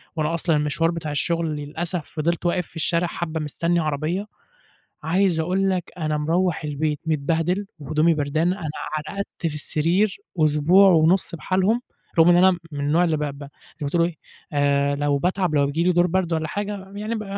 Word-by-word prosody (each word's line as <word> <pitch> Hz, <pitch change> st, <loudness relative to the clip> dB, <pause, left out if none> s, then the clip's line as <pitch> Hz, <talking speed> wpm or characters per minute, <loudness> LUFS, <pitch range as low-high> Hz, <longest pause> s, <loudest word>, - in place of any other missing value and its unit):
وأنا 155 Hz, +1 st, 0 dB
أصلًا 170 Hz, -1 st, +1 dB
المشوار 150 Hz, +3 st, +1 dB
بتاع 165 Hz, -3 st, -4 dB
الشغل 165 Hz, +2 st, -1 dB
للأسف 160 Hz, +3 st, -4 dB
فضلت 170 Hz, +3 st, -1 dB
واقف 175 Hz, -1 st, 0 dB
في -, -, -22 dB
الشارع 170 Hz, +2 st, 0 dB
حبة 165 Hz, -2 st, -4 dB
مستني 170 Hz, +3 st, 0 dB
عربية، 155 Hz, +5 st, -1 dB, 0.8 s
عايز 175 Hz, +1 st, +2 dB
أقول 185 Hz, +4 st, +1 dB
لك 185 Hz, -2 st, -2 dB
أنا 155 Hz, -3 st, -1 dB
مروّح 165 Hz, +3 st, 0 dB
البيت 150 Hz, 0 st, -2 dB
متبهدل 165 Hz, +5 st, 0 dB
وهدومي 155 Hz, +4 st, +2 dB
بردانة 155 Hz, +5 st, 0 dB
أنا 160 Hz, -, -4 dB, 0.4 s
رقدت 200 Hz, 0 st, -4 dB
في 165 Hz, -3 st, -2 dB
السرير 170 Hz, +7 st, +1 dB, 0.3 s
أسبوع 155 Hz, +6 st, +5 dB
ونُص 170 Hz, +2 st, +3 dB
بحالهم 190 Hz, +8 st, +1 dB, 0.4 s
رغم 165 Hz, +2 st, +7 dB
إن 175 Hz, -, +6 dB
أنا 185 Hz, -1 st, +5 dB
من 145 Hz, -, -5 dB
النوع 150 Hz, +5 st, +2 dB
اللي 160 Hz, -3 st, +1 dB
ب -, -, -5 dB
ب 140 Hz, 0 st, -5 dB
زي 140 Hz, -, -10 dB, 0.3 s
ما 140 Hz, -, -1 dB
تقول 170 Hz, +2 st, +2 dB
إيه 170 Hz, -1 st, -4 dB, 0.4 s
آآ، 140 Hz, 0 st, +2 dB
لو 145 Hz, 0 st, +1 dB
باتعب 180 Hz, 0 st, 0 dB
أو 140 Hz, -1 st, +4 dB
بييجي 150 Hz, +4 st, -1 dB
لي 180 Hz, -, +3 dB
دور 175 Hz, +1 st, +3 dB
برد 180 Hz, -1 st, 0 dB
ولا 160 Hz, -1 st, -1 dB
حاجة 200 Hz, +1 st, -5 dB
يعني 215 Hz, +3 st, -3 dB
ب 215 Hz, -, -4 dB
165 Hz, 185 wpm, -23 LUFS, 150-180 Hz, 0.8 s, رغم